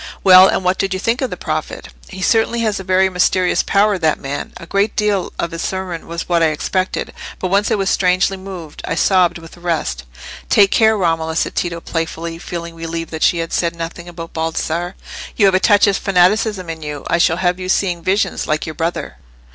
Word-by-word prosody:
"Well, 185 Hz, 0 st, +9 dB
and -, -, 0 dB
what 180 Hz, +1 st, +1 dB
did 195 Hz, -1 st, 0 dB
you -, -, -3 dB
think 230 Hz, +6 st, 0 dB
of 260 Hz, -, -1 dB
the -, -, -6 dB
prophet?" -, -, -4 dB, 0.2 s
"He 190 Hz, -1 st, -7 dB
certainly 230 Hz, +2 st, +2 dB
has 215 Hz, -3 st, 0 dB
a -, -, -6 dB
very 190 Hz, +1 st, +3 dB
mysterious 180 Hz, 0 st, +2 dB
power, 200 Hz, -1 st, +2 dB
that 160 Hz, -2 st, +2 dB
man. 140 Hz, +1 st, -5 dB
A -, -, -10 dB
great 200 Hz, +5 st, 0 dB
deal 205 Hz, -3 st, 0 dB
of 170 Hz, -, -2 dB
his 165 Hz, 0 st, -5 dB
sermon 190 Hz, -3 st, -4 dB
was 170 Hz, 0 st, -5 dB
what 170 Hz, -1 st, +2 dB
I 165 Hz, -, +5 dB
expected; 185 Hz, +4 st, -2 dB, 0.2 s
but 185 Hz, -, -3 dB
once 200 Hz, +1 st, +2 dB
I -, -, +2 dB
was 195 Hz, -2 st, 0 dB
strangely 185 Hz, +1 st, +2 dB
moved—I 185 Hz, -5 st, -7 dB
sobbed 180 Hz, -1 st, +3 dB
with 165 Hz, -1 st, -12 dB
the -, -, -15 dB
rest." 155 Hz, -, -2 dB, 0.4 s
"Take 200 Hz, -1 st, +5 dB
care, 220 Hz, -1 st, +4 dB
Romola," 165 Hz, -3 st, 0 dB
said -, -, 0 dB
Tito, 170 Hz, -1 st, -2 dB
playfully, 165 Hz, 0 st, -4 dB
feeling 170 Hz, -1 st, -6 dB
relieved 165 Hz, 0 st, -5 dB
that 160 Hz, -1 st, -6 dB
she 175 Hz, -, +3 dB
had 165 Hz, 0 st, -4 dB
said 170 Hz, -1 st, 0 dB
nothing 170 Hz, +1 st, -6 dB
about 165 Hz, -1 st, -9 dB
Baldassarre; 165 Hz, +2 st, -2 dB, 0.4 s
"you 205 Hz, -, +3 dB
have 195 Hz, -, +4 dB
a 185 Hz, -, +4 dB
touch 205 Hz, 0 st, +5 dB
of 200 Hz, -1 st, +2 dB
fanaticism 195 Hz, +1 st, +2 dB
in 165 Hz, -1 st, -6 dB
you. 150 Hz, -2 st, -6 dB
I 170 Hz, -, +1 dB
shall 165 Hz, -1 st, +3 dB
have 180 Hz, 0 st, 0 dB
you 185 Hz, 0 st, -5 dB
seeing 180 Hz, -3 st, +1 dB
visions, 195 Hz, +4 st, 0 dB
like 155 Hz, -1 st, -1 dB
your 155 Hz, -, -5 dB
brother." 165 Hz, -, -3 dB
180 Hz, 215 wpm, -18 LUFS, 165-195 Hz, 0.4 s, Well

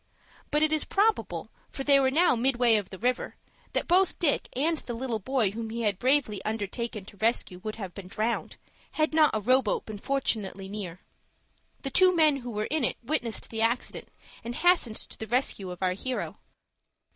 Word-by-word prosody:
But 300 Hz, +1 st, +2 dB
it 310 Hz, 0 st, +3 dB
is 310 Hz, -, +2 dB
probable, 425 Hz, +3 st, 0 dB, 0.2 s
for 270 Hz, -, -5 dB
they 280 Hz, 0 st, +5 dB
were 265 Hz, -1 st, +3 dB
now 320 Hz, +1 st, +4 dB
midway 240 Hz, -1 st, +3 dB
of 205 Hz, -3 st, -1 dB
the 190 Hz, -, -8 dB
river, 250 Hz, +5 st, -1 dB, 0.4 s
that -, -, 0 dB
both 365 Hz, +1 st, +3 dB
Dick 305 Hz, -5 st, +1 dB
and 310 Hz, +4 st, +1 dB
the 240 Hz, -, -6 dB
little 235 Hz, -2 st, -2 dB
boy 230 Hz, -2 st, +1 dB
whom 225 Hz, +1 st, -5 dB
he 230 Hz, +1 st, -3 dB
had 205 Hz, -4 st, 0 dB
bravely 255 Hz, -7 st, +2 dB
undertaken 215 Hz, 0 st, -3 dB
to 200 Hz, -, -14 dB
rescue 220 Hz, -4 st, 0 dB
would 215 Hz, +3 st, -5 dB
have 190 Hz, -5 st, -7 dB
been 195 Hz, -2 st, -9 dB
drowned, 220 Hz, +4 st, -2 dB, 0.4 s
had 310 Hz, 0 st, +1 dB
not 310 Hz, -1 st, +6 dB
a -, -, +1 dB
row 255 Hz, +5 st, +4 dB
boat 215 Hz, -, -2 dB
been 215 Hz, -2 st, -7 dB
fortunately 210 Hz, -7 st, -1 dB
near. 190 Hz, -3 st, -6 dB, 0.8 s
The 270 Hz, -, -3 dB
two 370 Hz, +4 st, +5 dB
men 310 Hz, -4 st, +5 dB
who 245 Hz, -2 st, -7 dB
were 210 Hz, -2 st, -2 dB
in 310 Hz, -3 st, +1 dB
it -, -, +1 dB
witnessed 235 Hz, -4 st, -2 dB
the 225 Hz, -1 st, -2 dB
accident, 235 Hz, +2 st, -1 dB, 0.4 s
and 235 Hz, +1 st, -5 dB
hastened 345 Hz, -11 st, +3 dB
to -, -, -7 dB
the 220 Hz, -, -5 dB
rescue 225 Hz, -5 st, 0 dB
of 180 Hz, +1 st, -6 dB
our 180 Hz, -1 st, +2 dB
hero. 255 Hz, +7 st, -4 dB
235 Hz, 195 wpm, -28 LUFS, 210-275 Hz, 0.8 s, not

